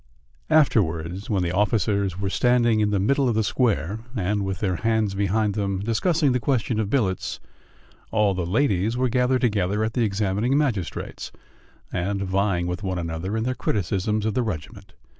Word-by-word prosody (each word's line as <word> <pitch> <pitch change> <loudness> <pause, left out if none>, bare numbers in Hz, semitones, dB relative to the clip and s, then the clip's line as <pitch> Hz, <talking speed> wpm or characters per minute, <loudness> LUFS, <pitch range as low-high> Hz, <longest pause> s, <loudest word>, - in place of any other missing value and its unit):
Afterwards, 95 - +2
when 100 -4 +1
the 85 - -1
officers 100 -1 +1
were 100 -1 -2
standing 120 -2 +3
in 105 -1 +2
the 100 -1 +1
middle 135 +6 +2
of 115 - 0
the 110 - +2
square, 105 - 0 0.2
and, 100 0 0
with 95 -1 -2
their 95 -4 0
hands 110 -3 +1
behind 100 +2 +1
them, 100 -2 -1
discussing 140 - +1
the 125 - +1
question 120 -3 0
of 105 -2 -1
billets, 100 -8 -1 0.7
all 105 -3 +2
the 90 -2 -3
ladies 110 0 +1
were 130 0 +1
gathered 125 +1 +2
together 105 -3 +1
at 110 0 -1
the 120 - 0
examining 105 +5 0
magistrate's 120 - -2 0.6
and 100 +2 -1
vying 95 -2 0
with 90 +2 -3
one 95 -2 -2
another 85 +5 -3
in 110 - -1
their 130 +2 0
criticisms 105 0 -1
of 110 - 0
the 125 - +1
regiment. 100 -11 -6
105 Hz, 175 wpm, -24 LUFS, 95-115 Hz, 0.7 s, standing